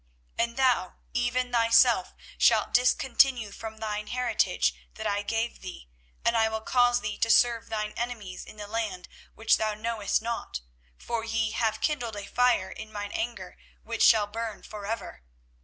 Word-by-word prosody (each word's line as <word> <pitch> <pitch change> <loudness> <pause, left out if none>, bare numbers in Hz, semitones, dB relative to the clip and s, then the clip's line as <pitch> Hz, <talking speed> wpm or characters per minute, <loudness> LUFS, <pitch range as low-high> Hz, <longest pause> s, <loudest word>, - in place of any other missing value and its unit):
24:017:004 235 - +3
And 235 - -16
thou, 255 -8 +2 0.2
even 245 +1 0
thyself, 230 -1 +4 0.2
shalt - - +4
discontinue 250 -2 +3
from 220 +1 -8
thine 210 -1 -4
heritage 245 -3 +1 0.2
that 220 - -7
I 205 -1 0
gave 225 +3 -2
thee; 180 - -9 0.3
and 235 - +3
I 225 -1 +3
will 220 0 -3
cause 245 +1 +3
thee - - -4
to 230 - +1
serve 235 0 +4
thine 215 -1 -2
enemies 225 -6 -5
in - - -13
the 210 - -6
land 210 -4 -3 0.3
which 225 0 +3
thou 215 -1 -1
knowest 220 -1 -1
not: 230 - -4 0.4
for 230 -1 -3
ye 225 -1 -1
have 220 -2 -1
kindled 245 -7 -1
a 205 -1 -6
fire 245 -5 +2
in 220 0 -9
mine 205 -1 -5
anger, 235 +1 -5 0.2
which - - -4
shall 220 -2 +6
burn 220 +1 -5
for 205 -1 -8
ever. 205 - -5
225 Hz, 170 wpm, -27 LUFS, 210-240 Hz, 0.4 s, shall